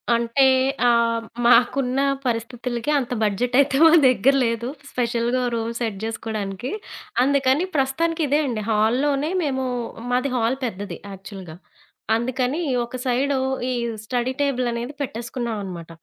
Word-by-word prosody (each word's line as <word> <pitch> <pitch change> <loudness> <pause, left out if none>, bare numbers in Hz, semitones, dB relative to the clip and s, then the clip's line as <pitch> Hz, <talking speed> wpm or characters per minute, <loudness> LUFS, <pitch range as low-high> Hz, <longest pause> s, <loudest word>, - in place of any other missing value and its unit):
అంటే 235 +4 +2 0.4
ఆహ్, 230 -1 +2 0.2
మాకున్న 250 +2 +4 0.2
పరిస్థితులకి 240 +2 -2
అంత 250 -3 -2
బడ్జెట్ 240 +4 0
అయితే 275 -1 +3
మా 325 - +8
దగ్గర 255 +2 +4
లేదు 230 +1 -1 0.2
స్పెషల్‌గా 240 0 0
ఓ 245 - 0
రూమ్ 230 0 -2
సెట్ 225 -4 -2
చేసుకోడానికి, 220 0 -4 0.5
అందుకని 275 +2 +2
ప్రస్తుతానికి 320 +5 0
ఇదే 290 +3 +2
అండి 230 -5 -2
హాల్‌లోనే 270 +8 +1
మేము 265 -2 -1 0.5
మాది 250 +2 +1
హాల్ 240 +2 +1
పెద్దది 205 -2 -5
యాక్చువల్‌గా. 190 -4 -9 0.6
అందుకని 255 +6 -1 0.2
ఒక 240 - -9
సైడు 265 +2 +1 0.3
ఈ - - 0 0.3
స్టడీ 250 +2 -1
టేబుల్ 255 -3 +1
అనేది 240 +4 -4
పెట్టేసుకున్నావనమాట 225 -8 -5
245 Hz, 125 wpm, -22 LUFS, 230-265 Hz, 0.6 s, మా